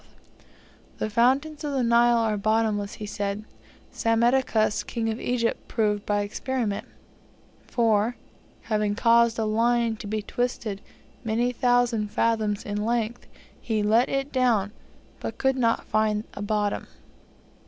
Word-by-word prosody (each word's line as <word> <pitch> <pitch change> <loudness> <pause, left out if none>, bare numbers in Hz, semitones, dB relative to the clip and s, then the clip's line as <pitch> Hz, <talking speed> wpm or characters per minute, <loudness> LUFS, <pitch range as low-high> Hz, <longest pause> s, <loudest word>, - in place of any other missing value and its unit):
That - - -2
the - - -3
fountains 275 +7 +2
of 290 -1 -2
the 265 -2 +1
Nile 235 0 +4
are 225 -2 +1
bottomless, 210 -1 0
he 215 - -7
said, 205 0 -3 0.5
Psammitichus, 230 -1 +2
king 225 -2 -2
of 220 - -5
Egypt, 235 -2 -1
proved 210 -2 0
by 205 0 +1
experiment: 215 0 -3 0.8
for, 225 0 +2 0.5
having 210 -2 0
caused 235 0 +4
a 220 - 0
line 230 +1 +1
to 210 - -8
be 215 0 -2
twisted 225 -4 -3 0.4
many 235 +2 0
thousand 245 -3 +2
fathoms 220 -1 0
in 205 0 -2
length, 235 +1 -2 0.3
he 220 -2 -1
let 225 +4 +3
it 275 +1 -2
down, 235 -6 +2 0.5
but - - -5
could 265 0 +1
not 230 -3 +1
find 215 -1 +1
a - - -7
bottom." 205 0 -1
225 Hz, 135 wpm, -25 LUFS, 210-240 Hz, 0.8 s, Nile